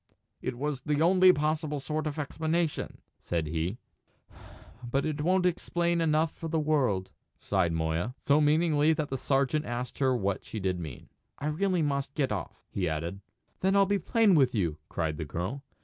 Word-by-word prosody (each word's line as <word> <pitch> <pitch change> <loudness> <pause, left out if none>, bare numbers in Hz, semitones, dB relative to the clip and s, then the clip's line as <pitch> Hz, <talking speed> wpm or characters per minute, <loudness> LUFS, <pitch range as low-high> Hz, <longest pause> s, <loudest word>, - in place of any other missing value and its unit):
"It 120 - -3
was 145 0 -2
the 150 +1 0
only 185 +3 +6
possible 150 -1 -1
sort 155 +3 -2
of 150 - -4
explanation," 160 +2 -2 0.2
said 85 -2 -2
he. 80 +7 -2 1.1
"But 135 +3 -1
it 150 -1 -2
won't 180 +3 +2
explain 170 -1 +1
enough 160 0 +2
for 165 - -6
the 160 0 +1
world," 130 -12 +1 0.3
sighed 95 -4 0
Moya, 80 +8 -1
so 145 +2 +4
meaningly 155 0 +3
that 155 -2 -2
the 135 - -2
sergeant 140 +3 +1
asked 120 +1 -4
her 130 -2 +3
what 100 -2 -1
she 110 - -6
did 95 -2 -1
mean. 80 -6 -8 0.3
"I 150 +2 -2
must 150 - -6
really 185 -4 +2 0.3
get 140 -6 0
off," 100 -5 -5
he 90 -3 -1
added. 85 +5 -4 0.4
"Then 190 +1 +2
I'll 200 0 +6
be 200 +1 +1
plain 215 +3 +3
with 135 -6 +4
you," 85 -7 0
cried 80 -2 -2
the 80 - -4
girl. 95 - -4
145 Hz, 180 wpm, -29 LUFS, 100-160 Hz, 1.1 s, only